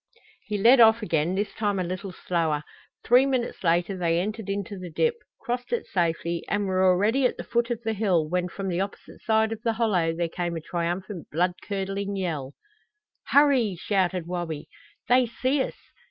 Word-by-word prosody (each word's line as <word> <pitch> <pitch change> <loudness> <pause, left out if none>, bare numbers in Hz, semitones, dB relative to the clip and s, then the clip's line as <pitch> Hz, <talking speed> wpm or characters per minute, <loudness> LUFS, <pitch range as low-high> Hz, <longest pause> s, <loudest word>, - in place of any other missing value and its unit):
He 210 - -1
led 240 +6 +6
off 225 -1 +6
again, 165 -2 0
this 205 +2 -2
time 205 -2 -1
a 185 - 0
little 185 +2 -5
slower. 165 -5 -1 0.4
Three 250 +3 +5
minutes 255 -6 -2
later 175 +3 +2
they 170 -2 +1
entered 210 +2 -4
into 200 0 -3
the 180 -1 -7
dip, 470 - +1 0.3
crossed 245 +1 -4
it 475 - -1
safely, 170 -1 -1
and 205 0 0
were 185 -1 +1
already 205 +8 +3
at - - -7
the - - -5
foot 235 0 0
of 235 -1 -3
the 225 -1 -1
hill, 190 -7 +1
when 180 +2 -1
from 195 +2 -5
the 180 0 0
opposite 200 +1 -7
side 220 0 +2
of 225 -1 -5
the 230 -1 0
hollow 205 -8 +1
there 170 0 0
came 175 0 -3
a - - -2
triumphant 175 +2 -4
blood 175 +3 +1
curdling 200 0 -3
yell. 155 -8 -3 0.7
"Hurry!" 270 -9 +4
shouted 185 -1 0
Wabi. 170 -4 -4 0.4
"They 250 0 +4
see 260 +4 0
us!" - - -3
195 Hz, 185 wpm, -26 LUFS, 175-225 Hz, 0.7 s, led